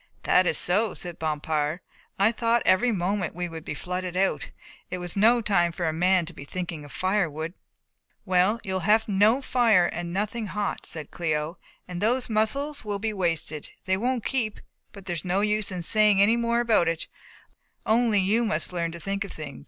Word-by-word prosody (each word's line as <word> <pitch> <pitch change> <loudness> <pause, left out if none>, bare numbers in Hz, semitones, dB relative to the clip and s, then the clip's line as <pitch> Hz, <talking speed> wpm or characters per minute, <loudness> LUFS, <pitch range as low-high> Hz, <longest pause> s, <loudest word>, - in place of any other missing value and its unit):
"That 185 0 +4
is - - +2
so," 200 +3 +2
said 175 -2 -6
Bompard, 155 0 -1 0.4
"I 200 +3 +4
thought 235 0 +1
every 215 +7 +4
moment 190 -3 -1
we 175 0 -3
would 165 -2 -8
be 150 - -5
flooded 180 +3 -4
out. 185 -7 0 0.4
It 185 - -3
was 175 -1 -3
no 230 +4 +4
time 175 -5 +2
for 175 +1 -3
a 160 - 0
man 180 +2 +3
to 170 - -9
be 140 - -10
thinking 170 0 -5
of 145 - -12
firewood." 170 -4 -1 0.7
"Well, 185 +4 +2
you 190 - -4
will 190 - 0
have 215 +5 +3
no 215 +6 +3
fire 230 -9 +4
and 175 0 -4
nothing 210 +4 -2
hot," 205 +1 -3
said 155 -3 -6
Cléo, 155 0 -2 0.3
"and 180 -1 -6
those 240 +3 +1
mussels 275 +8 0
will 205 -2 -3
be 215 +2 -2
wasted 165 -5 -1 0.2
they 190 - +2
won't 245 +3 -1
keep, 225 -6 -1 0.3
but 200 -3 -12
there's 175 -4 -3
no 185 +2 0
use 210 -1 0
in 180 -2 -4
saying 210 +1 +4
any 210 +4 +5
more 235 0 +1
about 225 -7 +3
it 165 0 -1 0.8
only 225 -1 +3
you 210 +5 +2
must 215 -4 -2
learn 170 -1 -1
to 170 - -8
think 195 +4 -2
of 195 - -8
things. 150 -4 -8
190 Hz, 195 wpm, -26 LUFS, 170-215 Hz, 0.8 s, any